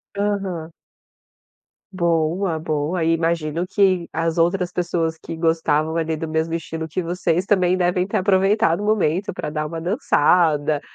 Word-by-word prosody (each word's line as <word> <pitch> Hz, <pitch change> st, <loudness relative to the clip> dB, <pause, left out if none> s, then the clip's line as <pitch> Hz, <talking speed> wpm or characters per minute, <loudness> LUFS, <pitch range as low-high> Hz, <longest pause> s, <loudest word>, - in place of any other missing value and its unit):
Aham. 195 Hz, -5 st, -2 dB, 1.2 s
Boa, 170 Hz, 0 st, 0 dB
boa. 155 Hz, +2 st, -1 dB
Imagino 165 Hz, 0 st, 0 dB
que 185 Hz, -3 st, +1 dB
as 165 Hz, +1 st, -1 dB
outras 180 Hz, +2 st, +1 dB
pessoas 170 Hz, -2 st, -1 dB
que 165 Hz, -, -8 dB
gostavam 160 Hz, -1 st, +1 dB
ali, 160 Hz, -1 st, -1 dB
do 160 Hz, -, -4 dB
mesmo 160 Hz, +1 st, -1 dB
estilo 160 Hz, -1 st, -4 dB
que 160 Hz, +4 st, -3 dB
vocês, 175 Hz, 0 st, -1 dB
também 185 Hz, -3 st, +2 dB
devem 180 Hz, 0 st, +1 dB
ter 200 Hz, -, -2 dB
aproveitado 190 Hz, -2 st, +2 dB
o -, -, -2 dB
momento 200 Hz, -2 st, +1 dB
pra 170 Hz, -, -4 dB
dar 155 Hz, 0 st, -3 dB
uma 165 Hz, +2 st, -5 dB
dançada, 160 Hz, -, +2 dB
170 Hz, 140 wpm, -21 LUFS, 160-185 Hz, 1.2 s, também